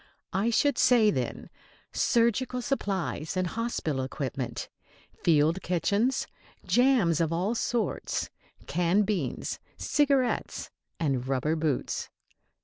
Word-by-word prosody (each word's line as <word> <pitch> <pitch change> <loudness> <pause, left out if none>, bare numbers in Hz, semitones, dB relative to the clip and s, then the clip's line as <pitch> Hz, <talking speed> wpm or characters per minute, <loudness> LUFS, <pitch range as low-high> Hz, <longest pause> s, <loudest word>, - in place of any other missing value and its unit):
I 200 +4 +1
should 285 +5 +2
say, 225 -4 +5
then, 130 -4 -4 0.4
surgical 240 +2 +1
supplies 190 - -2
and 185 - +1
hospital 180 - -2
equipment, 130 -2 -4 0.5
field 160 +2 +3
kitchens, 200 +9 +1 0.4
jams 240 - +3
of 165 -1 +1
all 180 +7 0
sorts, 235 -3 -1 0.3
canned 180 +6 +2
beans, 190 -10 -2 0.2
cigarettes 280 -4 +1 0.3
and 135 -6 0
rubber 135 +4 0
boots! 155 -5 -1
185 Hz, 100 wpm, -28 LUFS, 155-235 Hz, 0.5 s, say